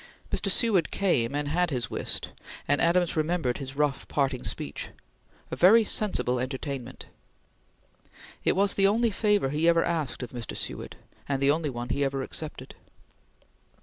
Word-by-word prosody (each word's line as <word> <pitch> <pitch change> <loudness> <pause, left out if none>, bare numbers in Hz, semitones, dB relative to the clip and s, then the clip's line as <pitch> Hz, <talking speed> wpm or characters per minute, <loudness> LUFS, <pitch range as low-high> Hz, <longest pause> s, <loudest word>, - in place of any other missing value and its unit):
Mr. - - 0
Seward 220 -8 +3
came 140 -10 +1
and 145 0 -1
had 175 +3 +1
his 125 -7 -2
whist, - - -3 0.4
and 145 - +2
Adams 170 0 +2
remembered 155 -5 0
his 135 -1 -6
rough 145 -1 0
parting 135 -3 0
speech: 70 - -5 0.6
"A - - -2
very 220 +6 +6
sensible 190 - 0
entertainment!" 130 0 -5 1.4
It - - +2
was 200 +1 +2
the 195 0 +4
only 225 +3 +2
favor 205 -7 +2
he 150 +4 +1
ever 170 -1 +5
asked 155 -7 -2
of 125 - -7
Mr. 120 -3 -6
Seward, - - -4 0.3
and 135 -1 0
the 140 +1 +4
only 155 0 0
one 120 -1 -5
he 140 +3 0
ever 135 -1 -1
accepted. 155 +3 -6
150 Hz, 155 wpm, -27 LUFS, 135-180 Hz, 1.4 s, very